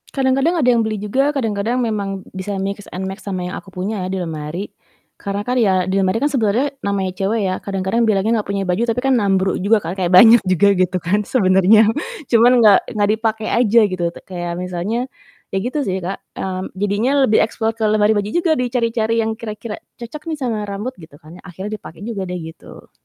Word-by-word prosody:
Kadang-kadang 270 Hz, +5 st, +1 dB
ada 265 Hz, -, +1 dB
yang 235 Hz, -2 st, +4 dB
beli 215 Hz, -1 st, -2 dB
juga, 260 Hz, +8 st, +1 dB
kadang-kadang 230 Hz, -3 st, -1 dB
memang 200 Hz, -5 st, -3 dB
b -, -, -19 dB
bisa 200 Hz, 0 st, -3 dB
mix 200 Hz, +1 st, -4 dB
and 190 Hz, +1 st, -4 dB
max 195 Hz, +2 st, -7 dB
sama 185 Hz, -3 st, -4 dB
yang 180 Hz, -, -5 dB
aku 190 Hz, -, -10 dB
punya 190 Hz, +2 st, -3 dB
ya -, -, -3 dB
di 190 Hz, -, -2 dB
lemari. 165 Hz, +2 st, -5 dB, 0.5 s
Karena 200 Hz, 0 st, -4 dB
kan 250 Hz, -, 0 dB
ya 190 Hz, -6 st, +2 dB
di 190 Hz, -, -1 dB
lemari 195 Hz, +2 st, +1 dB
kan 285 Hz, -, +2 dB
sebenarnya 265 Hz, +1 st, 0 dB
namanya 195 Hz, -2 st, -1 dB
cewek 200 Hz, +4 st, -1 dB
ya 185 Hz, -, 0 dB
kadang-kadang 195 Hz, +3 st, -1 dB
bilangnya 215 Hz, +1 st, +1 dB
gak -, -, -15 dB
punya 195 Hz, -1 st, -2 dB
baju, 180 Hz, +5 st, +1 dB
tapi 235 Hz, 0 st, 0 dB
kan 265 Hz, +1 st, +2 dB
nambru 195 Hz, -4 st, +1 dB
juga 215 Hz, +2 st, +4 dB
kan, 170 Hz, -1 st, -5 dB
kayak 180 Hz, -2 st, -1 dB
banyak 225 Hz, +5 st, +8 dB
juga 185 Hz, +1 st, +3 dB
gitu 185 Hz, 0 st, +1 dB
kan 195 Hz, +5 st, 0 dB
sebenarnya, 200 Hz, 0 st, +4 dB, 0.4 s
cuman 235 Hz, +1 st, +5 dB
nggak 210 Hz, -4 st, +7 dB
nggak 205 Hz, -3 st, 0 dB
dipake 220 Hz, -1 st, -2 dB
aja 235 Hz, -1 st, +3 dB
gitu 185 Hz, -2 st, -4 dB
te -, -, -12 dB
kayak 175 Hz, -2 st, -4 dB
misalnya 180 Hz, +4 st, -3 dB, 0.6 s
iya -, -, +1 dB
gitu 255 Hz, +5 st, -2 dB
sih, 190 Hz, 0 st, -1 dB
Kak, 190 Hz, +3 st, -3 dB, 0.2 s
mmm, 185 Hz, 0 st, -5 dB
jadinya 205 Hz, +6 st, 0 dB, 0.2 s
lebih 215 Hz, -, +4 dB
explore 220 Hz, 0 st, -1 dB
ke 225 Hz, -, -3 dB
lemari 210 Hz, 0 st, +3 dB
baju 205 Hz, 0 st, -1 dB
juga, 345 Hz, -1 st, +2 dB
dicari-cari 230 Hz, -2 st, 0 dB
yang 220 Hz, -, -1 dB
kira-kira 215 Hz, 0 st, -6 dB, 0.2 s
cocok 240 Hz, +6 st, -8 dB
nih 320 Hz, -1 st, -3 dB
sama 240 Hz, -4 st, -1 dB
rambut 200 Hz, +5 st, -4 dB
gitu 160 Hz, -3 st, -14 dB
kan 160 Hz, +3 st, -13 dB
yang -, -, -18 dB
akhirnya 190 Hz, +4 st, -7 dB
dipake 165 Hz, -, -12 dB
juga 215 Hz, -3 st, -4 dB
deh 180 Hz, -, -4 dB
gitu. 160 Hz, 0 st, -12 dB
205 Hz, 210 wpm, -19 LUFS, 190-230 Hz, 0.6 s, banyak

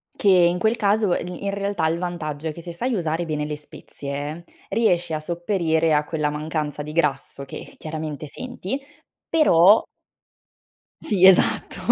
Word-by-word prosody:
Che -, -, -1 dB
in 180 Hz, -2 st, +5 dB
quel 220 Hz, +4 st, +2 dB
caso 205 Hz, -3 st, +2 dB
e -, -, -1 dB
in 180 Hz, +3 st, -4 dB
realtà 200 Hz, -4 st, -1 dB
il 165 Hz, +1 st, 0 dB
vantaggio 165 Hz, -4 st, -4 dB
è 155 Hz, -, -3 dB
che 170 Hz, -, -10 dB
se 170 Hz, 0 st, -7 dB
sai 245 Hz, +9 st, -2 dB
usare 170 Hz, -4 st, -1 dB
bene 150 Hz, -2 st, -2 dB
le 150 Hz, 0 st, -3 dB
spezie 145 Hz, +1 st, -7 dB, 0.3 s
riesci 175 Hz, -6 st, +1 dB
a 155 Hz, -, -1 dB
sopperire 165 Hz, -1 st, 0 dB
a 150 Hz, 0 st, +3 dB
quella 150 Hz, -1 st, -1 dB
mancanza 150 Hz, -1 st, -3 dB
di 150 Hz, -, -7 dB
grasso 140 Hz, -3 st, -1 dB
che -, -, -10 dB
chiaramente 155 Hz, -1 st, -5 dB
senti, 250 Hz, -, -5 dB, 0.5 s
però 210 Hz, -, +6 dB, 1.2 s
Sì, 190 Hz, -3 st, +3 dB
esatto, 190 Hz, -1 st, +4 dB
170 Hz, 155 wpm, -23 LUFS, 155-190 Hz, 1.2 s, però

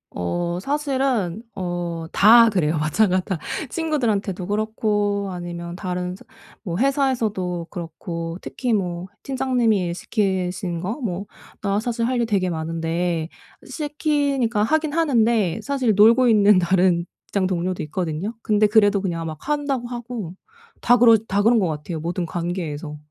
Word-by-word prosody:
어 175 Hz, -, -2 dB
사실은 265 Hz, -, -1 dB
어 175 Hz, -2 st, -3 dB, 0.3 s
다 230 Hz, +3 st, +7 dB
그래요. 165 Hz, -6 st, +1 dB
마찬가지 185 Hz, +4 st, +2 dB
다. 190 Hz, -4 st, -2 dB, 0.3 s
친구들한테도 220 Hz, -, -1 dB
그렇고 205 Hz, -1 st, 0 dB
아니면 175 Hz, -1 st, -6 dB
다른 180 Hz, -1 st, -3 dB
서 -, -, -16 dB, 0.4 s
뭐 175 Hz, -3 st, -3 dB
회사에서도 225 Hz, -, 0 dB
그렇고 165 Hz, -1 st, -6 dB
특히 245 Hz, -3 st, -2 dB
뭐 180 Hz, -2 st, -2 dB, 0.2 s
팀장님이 250 Hz, -6 st, +1 dB
일 170 Hz, -, -2 dB
시키신 185 Hz, -3 st, -2 dB
거 195 Hz, +4 st, -2 dB
뭐 195 Hz, -3 st, -3 dB, 0.4 s
나 200 Hz, 0 st, 0 dB
사실 230 Hz, 0 st, -1 dB
할 255 Hz, -1 st, 0 dB
일 235 Hz, -, +2 dB
되게 195 Hz, -5 st, 0 dB
많은데 165 Hz, +1 st, -2 dB, 0.4 s
시키니까 285 Hz, -7 st, 0 dB
하긴 310 Hz, +4 st, +1 dB
하는데 230 Hz, -, +2 dB
사실 260 Hz, -5 st, +1 dB
놀고 230 Hz, +4 st, +6 dB
있는 210 Hz, -3 st, +5 dB
다른 175 Hz, -1 st, +2 dB, 0.2 s
직장 195 Hz, -2 st, 0 dB
동료도 180 Hz, 0 st, -2 dB
있거든요. 165 Hz, +5 st, -3 dB
근데 215 Hz, 0 st, +3 dB
그래도 205 Hz, -1 st, +4 dB
그냥 170 Hz, -4 st, -3 dB
막 155 Hz, -1 st, -6 dB
한다고 285 Hz, -5 st, -1 dB
하고 240 Hz, -7 st, -6 dB, 0.5 s
다 245 Hz, -, +5 dB
그러 230 Hz, -1 st, +7 dB
다 200 Hz, +1 st, +2 dB
그런 230 Hz, 0 st, +5 dB
것 185 Hz, -, +1 dB
같아요, 155 Hz, +1 st, -4 dB
모든 175 Hz, +1 st, -2 dB
관계에서. 165 Hz, -3 st, -4 dB
200 Hz, 300 characters per minute, -22 LUFS, 175-235 Hz, 0.5 s, 다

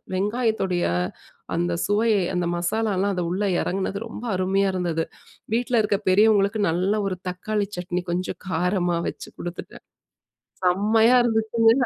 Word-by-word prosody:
வெங்காயத்துடைய 205 Hz, -3 st, 0 dB, 0.7 s
அந்த 175 Hz, +1 st, 0 dB
சுவையை 210 Hz, -1 st, +2 dB
அந்த 175 Hz, -1 st, 0 dB
மசாலாலாம் 200 Hz, +1 st, 0 dB
அது 180 Hz, -, -1 dB
உள்ள 195 Hz, +3 st, -1 dB, 0.2 s
எறங்குனது 195 Hz, +1 st, -2 dB
ரொம்ப 225 Hz, -, -8 dB
அருமையா 195 Hz, +2 st, +1 dB
இருந்தது. 170 Hz, -3 st, -1 dB, 0.5 s
வீட்ல 240 Hz, 0 st, +1 dB
இருக்குற 205 Hz, -2 st, 0 dB
பெரியவங்களுக்கு 205 Hz, +1 st, +4 dB
நல்ல 185 Hz, +5 st, +1 dB
ஒரு 185 Hz, -2 st, -3 dB
தக்காளி 205 Hz, +3 st, -2 dB
சட்னி, 180 Hz, 0 st, -3 dB
கொஞ்சம் 180 Hz, +2 st, -3 dB
காரமா 180 Hz, 0 st, +1 dB
வச்சு -, -, -9 dB
குடுத்துட்டேன். 175 Hz, 0 st, -7 dB, 0.8 s
செம்மையா 220 Hz, +6 st, +4 dB
இருந்துச்சுங்க. 225 Hz, 0 st, +3 dB
195 Hz, 120 wpm, -24 LUFS, 180-220 Hz, 0.8 s, பெரியவங்களுக்கு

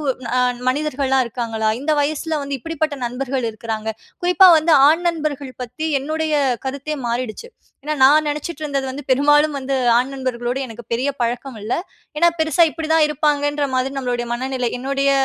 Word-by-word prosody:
ஒரு 265 Hz, -, 0 dB, 0.5 s
மனிதர்கள்லாம் 270 Hz, -2 st, 0 dB
இருக்காங்களா? 225 Hz, -2 st, -2 dB
இந்த 310 Hz, +2 st, +1 dB
வயசுல 310 Hz, +2 st, -1 dB
வந்து 280 Hz, 0 st, -3 dB
இப்பிடிப்பட்ட 315 Hz, +1 st, -2 dB
நண்பர்கள் 250 Hz, 0 st, -2 dB
இருக்குறாங்க. 220 Hz, 0 st, -5 dB, 0.3 s
குறிப்பா 360 Hz, +1 st, +6 dB
வந்து 320 Hz, +2 st, +2 dB, 0.2 s
ஆண் 330 Hz, +3 st, +2 dB
நண்பர்கள் 295 Hz, -5 st, -4 dB
பத்தி 250 Hz, +6 st, -6 dB
என்னுடைய 310 Hz, +3 st, -2 dB, 0.3 s
கருத்தே 280 Hz, +3 st, -4 dB
மாறிடுச்சு. 240 Hz, -, -3 dB, 0.4 s
ஏன்னா 305 Hz, +2 st, -2 dB
நான் 305 Hz, +3 st, +6 dB
நெனைச்சிட்டு 300 Hz, +1 st, -4 dB
இருந்தது 275 Hz, -2 st, -2 dB
வந்து 285 Hz, +3 st, -7 dB
பெரும்பாலும் 295 Hz, +2 st, +4 dB
வந்து 270 Hz, +1 st, -3 dB, 0.2 s
ஆண் 255 Hz, +2 st, -1 dB
நண்பர்களோடு 250 Hz, -1 st, -3 dB
எனக்கு 230 Hz, -1 st, -10 dB
பெரிய 255 Hz, +4 st, 0 dB
பழக்கம் 240 Hz, +1 st, -2 dB
இல்ல. 220 Hz, -, -4 dB, 0.4 s
ஏன்னா 340 Hz, +3 st, +5 dB
பெருசா 320 Hz, +1 st, +4 dB
இப்படி 320 Hz, 0 st, -6 dB
தான் 315 Hz, -2 st, +5 dB
இருப்பாங்கன்ற 290 Hz, -1 st, 0 dB
மாதிரி 260 Hz, +2 st, -1 dB
நம்மளுடைய 245 Hz, -2 st, -2 dB
மனநிலை. 255 Hz, 0 st, -2 dB
என்னுடைய 275 Hz, +2 st, 0 dB
275 Hz, 155 wpm, -20 LUFS, 250-305 Hz, 0.5 s, குறிப்பா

